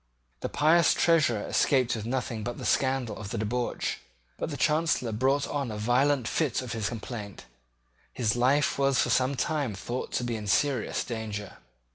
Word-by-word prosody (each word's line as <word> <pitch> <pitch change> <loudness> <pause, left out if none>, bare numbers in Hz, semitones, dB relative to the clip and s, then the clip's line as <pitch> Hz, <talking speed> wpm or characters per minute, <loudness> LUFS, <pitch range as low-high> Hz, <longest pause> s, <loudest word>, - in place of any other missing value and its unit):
The - - -3
pious 160 +2 +4
Treasurer 150 -11 +3
escaped 130 -4 +2
with 110 0 -5
nothing 120 -3 -2
but 120 +2 -4
the - - -6
scandal 130 -5 +1
of 100 -3 -7
the 115 - -3
debauch: 120 +3 -2 0.4
but - - -2
the - - -5
Chancellor 155 -6 +1
brought 135 +6 +1
on 140 -4 -2
a 105 - -5
violent 125 +3 +2
fit 135 -1 0
of 125 - -6
his 110 -3 -1
complaint. 105 -3 -7 0.7
His 115 -3 0
life 140 +4 +2
was 135 -1 +3
for - - +2
some 130 +2 +2
time 140 -6 -1
thought 120 +6 -5
to - - 0
be 120 -1 -2
in 105 -2 -6
serious 130 +3 +1
danger. 105 -4 -5
125 Hz, 175 wpm, -28 LUFS, 110-140 Hz, 0.7 s, pious